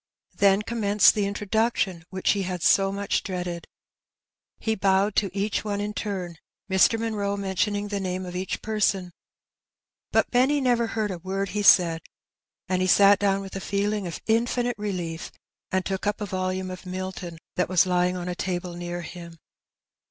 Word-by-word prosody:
Then 200 Hz, +1 st, +4 dB
commenced 210 Hz, -3 st, +4 dB
the 205 Hz, -2 st, 0 dB
introduction 205 Hz, -4 st, -1 dB
which 190 Hz, 0 st, +1 dB
he 200 Hz, -, 0 dB
had 180 Hz, -3 st, -3 dB
so 195 Hz, 0 st, +4 dB
much 200 Hz, 0 st, -1 dB
dreaded. 180 Hz, -2 st, -4 dB, 0.9 s
He 220 Hz, -, -1 dB
bowed 195 Hz, 0 st, +2 dB
to 200 Hz, -, +2 dB
each 200 Hz, +2 st, -1 dB
one 205 Hz, -1 st, -2 dB
ia 205 Hz, +1 st, -3 dB
turn, 185 Hz, -6 st, -4 dB, 0.3 s
Mr. 190 Hz, +4 st, +4 dB
Munroe 205 Hz, -3 st, -1 dB
mentioning 205 Hz, +1 st, -1 dB
the 200 Hz, -1 st, -2 dB
name 185 Hz, -1 st, -3 dB
of 180 Hz, 0 st, -7 dB
each 185 Hz, +1 st, -3 dB
person; 200 Hz, -4 st, 0 dB, 1.0 s
but -, -, +2 dB
Benny 265 Hz, +4 st, +3 dB
never 240 Hz, -3 st, +2 dB
heard 215 Hz, -2 st, -2 dB
a 180 Hz, -, -5 dB
word 195 Hz, +2 st, -3 dB
he 210 Hz, -, -2 dB
said,^ 170 Hz, -5 st, +5 dB, 0.7 s
and 185 Hz, 0 st, 0 dB
he 185 Hz, -, +2 dB
sat 200 Hz, +2 st, +6 dB
down 195 Hz, -1 st, +1 dB
with 195 Hz, 0 st, -9 dB
a -, -, -2 dB
feeling 200 Hz, 0 st, -1 dB
of 170 Hz, -, -6 dB
infinite 240 Hz, +1 st, +1 dB
relief, 180 Hz, -5 st, -4 dB, 0.4 s
and 185 Hz, 0 st, 0 dB
took 195 Hz, +1 st, -2 dB
up 205 Hz, +1 st, 0 dB
a 210 Hz, -, -3 dB
volume 185 Hz, -1 st, -2 dB
of 185 Hz, 0 st, -9 dB
Milton 185 Hz, -2 st, -5 dB, 0.2 s
that 180 Hz, -, 0 dB
was 185 Hz, -1 st, +4 dB
lying 180 Hz, 0 st, +1 dB
on 180 Hz, 0 st, -5 dB
a 180 Hz, -, -2 dB
table 175 Hz, 0 st, -3 dB
near 175 Hz, 0 st, -5 dB
him. 170 Hz, -1 st, -9 dB
195 Hz, 175 wpm, -25 LUFS, 180-205 Hz, 1.0 s, sat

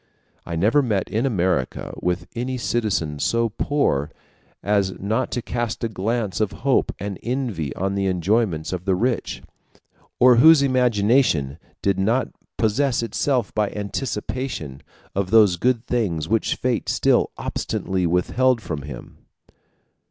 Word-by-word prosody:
I 85 Hz, -, -3 dB
never 105 Hz, -, +3 dB
met 105 Hz, -8 st, -1 dB
in 115 Hz, +5 st, +1 dB
America 90 Hz, -, -1 dB
with 90 Hz, -1 st, -1 dB
any 125 Hz, +2 st, -2 dB
citizen 105 Hz, -11 st, -1 dB
so 115 Hz, +8 st, +1 dB
poor 105 Hz, -, 0 dB, 0.5 s
as 100 Hz, -2 st, 0 dB
not 110 Hz, +6 st, -1 dB
to 120 Hz, -, -2 dB
cast 120 Hz, -2 st, -3 dB
a 115 Hz, -, 0 dB
glance 110 Hz, +1 st, -2 dB
of 105 Hz, -2 st, 0 dB
hope 135 Hz, -, +3 dB
and 100 Hz, -1 st, -5 dB
envy 115 Hz, -, -2 dB
on 95 Hz, +1 st, -1 dB
the 100 Hz, 0 st, 0 dB
enjoyments 95 Hz, -2 st, 0 dB
of 90 Hz, 0 st, -5 dB
the 95 Hz, -2 st, +2 dB
rich, 120 Hz, +5 st, -1 dB, 0.8 s
or 125 Hz, -1 st, +7 dB
whose 155 Hz, +3 st, +7 dB
imagination 115 Hz, -, +2 dB, 0.2 s
did 100 Hz, -1 st, +1 dB
not 115 Hz, +7 st, +1 dB, 0.3 s
possess 120 Hz, +3 st, +1 dB
itself 125 Hz, 0 st, -1 dB
by 105 Hz, -2 st, +1 dB
anticipation 105 Hz, -, -4 dB, 0.3 s
of 100 Hz, -1 st, -1 dB
those 105 Hz, -4 st, +5 dB
good 120 Hz, +5 st, 0 dB
things 95 Hz, -12 st, -1 dB
which 110 Hz, 0 st, +1 dB
fate 125 Hz, -2 st, -1 dB
still -, -, +2 dB
obstinately 95 Hz, -2 st, -2 dB
withheld 120 Hz, +9 st, +2 dB
from 80 Hz, -8 st, -5 dB
him. 70 Hz, -4 st, -10 dB
105 Hz, 135 wpm, -22 LUFS, 90-120 Hz, 0.8 s, or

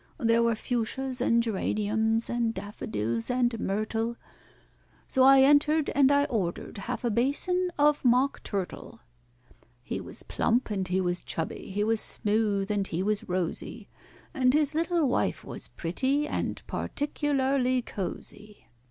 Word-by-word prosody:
There 230 Hz, -5 st, +2 dB
were 235 Hz, -1 st, +2 dB
fuchsias 250 Hz, +3 st, -1 dB
and 235 Hz, -2 st, +3 dB
geraniums, 220 Hz, +1 st, 0 dB
and 235 Hz, -1 st, -1 dB
daffodils 115 Hz, -, -3 dB
and 245 Hz, -2 st, +1 dB
myrtle, 225 Hz, +4 st, -2 dB, 0.9 s
So 265 Hz, -, +1 dB
I 270 Hz, +1 st, +8 dB
entered, 295 Hz, +2 st, +4 dB
and 275 Hz, -1 st, +4 dB
I 285 Hz, 0 st, +4 dB
ordered 200 Hz, -3 st, -3 dB
half 235 Hz, +4 st, -4 dB
a 240 Hz, -, +1 dB
basin 325 Hz, -, +1 dB
of 295 Hz, 0 st, +3 dB
mock 255 Hz, +2 st, +2 dB
turtle. 195 Hz, -3 st, -5 dB, 0.8 s
He -, -, -4 dB
was -, -, -5 dB
plump 240 Hz, -1 st, 0 dB
and 190 Hz, -2 st, -2 dB
he 185 Hz, +1 st, 0 dB
was 180 Hz, -1 st, 0 dB
chubby, 165 Hz, -, -4 dB
he 205 Hz, +2 st, -1 dB
was 225 Hz, 0 st, +2 dB
smooth 205 Hz, -1 st, +1 dB
and 200 Hz, -2 st, 0 dB
he 175 Hz, +2 st, -2 dB
was 210 Hz, -1 st, -2 dB
rosy, 180 Hz, -2 st, -3 dB, 0.4 s
And 255 Hz, +1 st, +3 dB
his 300 Hz, -1 st, +2 dB
little 335 Hz, -1 st, +1 dB
wife 250 Hz, -, 0 dB
was -, -, -5 dB
pretty 265 Hz, -, 0 dB
and -, -, -3 dB
particularly 270 Hz, -3 st, 0 dB
cosy. 210 Hz, -, -6 dB
230 Hz, 140 wpm, -28 LUFS, 205-270 Hz, 0.9 s, I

